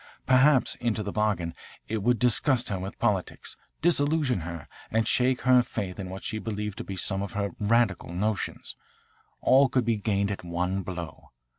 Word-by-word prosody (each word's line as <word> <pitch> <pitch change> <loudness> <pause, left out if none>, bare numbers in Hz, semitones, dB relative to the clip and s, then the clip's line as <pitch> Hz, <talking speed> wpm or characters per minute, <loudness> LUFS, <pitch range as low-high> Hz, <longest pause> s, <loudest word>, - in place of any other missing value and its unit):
Perhaps 130 +1 +4
into 115 -3 -1
the 100 - -4
bargain 100 -6 0 0.3
it 110 -1 -2
would 120 +3 +2
disgust 125 +2 +2
her 100 -2 -2
with 95 +2 -6
politics, 105 -6 -1 0.3
disillusion 145 - +2
her, 85 -3 -7 0.2
and 110 0 +1
shake 125 0 +2
her 130 -1 +6
faith 100 -5 -5
in 95 -2 -5
what 95 +1 -7
he 110 - -3
believed 105 -2 -4
to - - -3
be 95 - -6
some 95 +1 -1
of 100 - -5
her 100 -1 -1
'radical' 105 -4 +1
notions. 105 +4 -2 0.7
All 135 +1 +5
could 125 -3 +1
be 115 -2 +1
gained 100 -1 0
at 100 - -5
one 90 +3 -1
blow. 85 -3 -7
105 Hz, 175 wpm, -27 LUFS, 95-125 Hz, 0.7 s, her